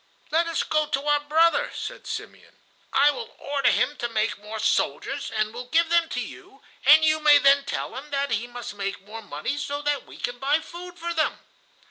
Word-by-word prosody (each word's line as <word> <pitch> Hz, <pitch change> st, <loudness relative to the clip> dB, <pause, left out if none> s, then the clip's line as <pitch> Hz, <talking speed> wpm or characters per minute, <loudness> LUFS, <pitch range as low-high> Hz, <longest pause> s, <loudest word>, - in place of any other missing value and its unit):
"Let 330 Hz, +2 st, +2 dB
us 335 Hz, -, 0 dB
go 310 Hz, -, +1 dB
again -, -, -13 dB
to 275 Hz, +2 st, -1 dB
our 295 Hz, 0 st, +4 dB
brother," 330 Hz, +11 st, +3 dB
said -, -, -6 dB
Simeon; -, -, -7 dB, 0.4 s
"I 290 Hz, -, +5 dB
will 460 Hz, +9 st, -8 dB
order 280 Hz, -1 st, +1 dB
him 270 Hz, +4 st, +1 dB
to 240 Hz, -, -3 dB
make 215 Hz, -2 st, -1 dB
more 210 Hz, +2 st, -7 dB
soldiers -, -, 0 dB
and 215 Hz, 0 st, -1 dB
will 245 Hz, +1 st, -6 dB
give 330 Hz, +2 st, +3 dB
them 340 Hz, -1 st, +3 dB
to -, -, -3 dB
you, -, -, -9 dB, 0.2 s
and 315 Hz, +2 st, +8 dB
you 310 Hz, 0 st, +3 dB
may 300 Hz, -1 st, +7 dB
then 280 Hz, 0 st, +4 dB
tell 280 Hz, -, -4 dB
him 275 Hz, +3 st, -8 dB
that 280 Hz, -1 st, -1 dB
he 230 Hz, +1 st, -1 dB
must 245 Hz, -2 st, -7 dB
make 195 Hz, -1 st, -5 dB
more 225 Hz, +2 st, -8 dB
money 205 Hz, -, -4 dB
so 285 Hz, +1 st, -4 dB
that 290 Hz, -1 st, -1 dB
we -, -, -12 dB
can 245 Hz, 0 st, -4 dB
buy 285 Hz, +4 st, +2 dB
food 355 Hz, +2 st, -10 dB
for 340 Hz, 0 st, -3 dB
them." 315 Hz, -2 st, 0 dB
285 Hz, 215 wpm, -25 LUFS, 240-315 Hz, 0.4 s, and